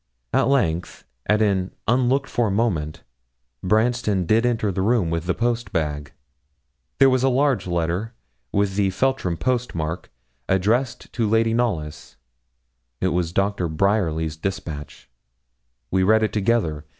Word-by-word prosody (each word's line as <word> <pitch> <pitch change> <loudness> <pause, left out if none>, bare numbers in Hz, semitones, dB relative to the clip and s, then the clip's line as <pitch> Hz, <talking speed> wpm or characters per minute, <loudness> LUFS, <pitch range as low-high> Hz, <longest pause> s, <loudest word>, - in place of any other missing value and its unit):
At - - +3
length, 90 -12 0 0.2
at 105 +1 +3
an 95 -3 0
unlooked 130 +4 +2
for 120 -3 0
moment, 95 -8 -1 0.6
Branston 110 -2 +1
did 115 +7 +3
enter 115 -4 0
the 95 - -2
room 105 -5 +2
with 85 +1 -2
the 90 - +1
post 120 -3 -1
bag. 75 -5 -2 0.9
There 135 - +6
was 130 -1 +3
a 135 - +3
large 130 -7 +1
letter, 85 +6 -2 0.4
with 100 -1 0
the 100 -2 +2
Feltram 95 -5 0
post 125 -1 -1
mark, 80 +1 -4 0.4
addressed 110 +7 0
to 115 -4 0
Lady 115 +1 +2
Knollys 100 -11 -2 0.8
it 95 - +1
was 90 -2 -1
Doctor 100 -1 0
Bryerly's 80 -3 0
despatch; 80 -5 -6 0.8
we 95 - +2
read 110 +4 +4
it 110 - -1
together. 100 -8 0
100 Hz, 140 wpm, -22 LUFS, 85-120 Hz, 0.9 s, There